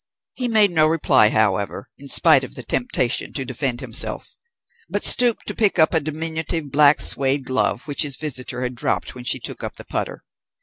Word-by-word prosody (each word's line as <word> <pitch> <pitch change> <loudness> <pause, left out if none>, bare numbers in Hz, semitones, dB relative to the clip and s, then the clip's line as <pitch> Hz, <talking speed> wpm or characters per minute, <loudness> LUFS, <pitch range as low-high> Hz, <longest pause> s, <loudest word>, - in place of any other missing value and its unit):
He 250 - -4
made 215 -4 +3
no 155 -2 +3
reply, 145 -8 +3
however, 100 -2 -1
in 140 - -12
spite 145 -1 +3
of 130 - -9
the 125 - -7
temptation 120 0 -2
to 135 -3 -2
defend 130 0 -3
himself; 130 +3 +2 0.5
but - - -2
stooped 240 -2 +3
to - - -5
pick 210 -5 +1
up 160 0 +3
a 160 - +3
diminutive 160 0 -3
black 145 +1 +4
suede 135 0 +1
glove 130 0 -1
which 145 - -2
his 140 -4 0
visitor 130 -4 -5
had 125 0 -3
dropped 120 - -3
when 125 -1 -11
she 130 - +2
took 115 - -2
up - - -6
the - - -12
putter. - - -5
140 Hz, 190 wpm, -21 LUFS, 125-160 Hz, 0.5 s, black